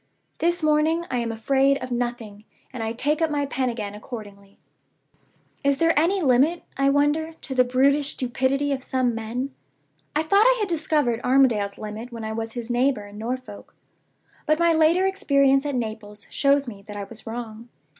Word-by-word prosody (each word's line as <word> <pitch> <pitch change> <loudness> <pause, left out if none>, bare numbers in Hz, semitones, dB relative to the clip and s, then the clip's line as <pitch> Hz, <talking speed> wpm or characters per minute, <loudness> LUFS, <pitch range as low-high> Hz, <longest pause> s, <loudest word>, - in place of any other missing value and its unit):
"This 345 0 +1
morning 310 +2 +2
I 250 - 0
am 230 -1 -2
afraid 270 +5 +2
of 255 -2 -7
nothing, 240 -4 -4 0.3
and 250 - -5
I 225 0 -2
take 290 +7 -1
up 325 - +2
my 290 -1 0
pen 260 -2 -1
again 215 -4 -5
accordingly. 205 -3 -10 1.1
"Is 280 0 +2
there 330 +2 +3
any 355 +5 +2
limit, 280 +6 +3
I 275 +1 +2
wonder, 295 +3 +1
to 295 -3 -8
the 255 -1 +4
brutish 275 +3 +2
stupidity 265 +3 0
of 270 -1 -1
some 255 -2 0
men? 235 +4 -4 0.6
I 305 - +2
thought 395 +6 +4
I - - +4
had 420 - 0
discovered 300 -8 0
Armadale's 240 -6 +2
limit 215 +3 -7
when 230 -1 -7
I 220 - -4
was 225 0 -4
his 240 -1 -5
neighbor 245 -3 +1
in 205 +1 -11
Norfolk; 245 -1 -6 0.7
but 310 - +3
my 340 0 +3
later 325 +4 +3
experience 280 -8 +2
at 285 - -2
Naples 215 -3 -5
shows 280 -1 +2
me 205 -4 -8
that 210 - -8
I 200 - -4
was 220 +3 -11
wrong. 230 0 -7
260 Hz, 180 wpm, -24 LUFS, 225-295 Hz, 1.1 s, the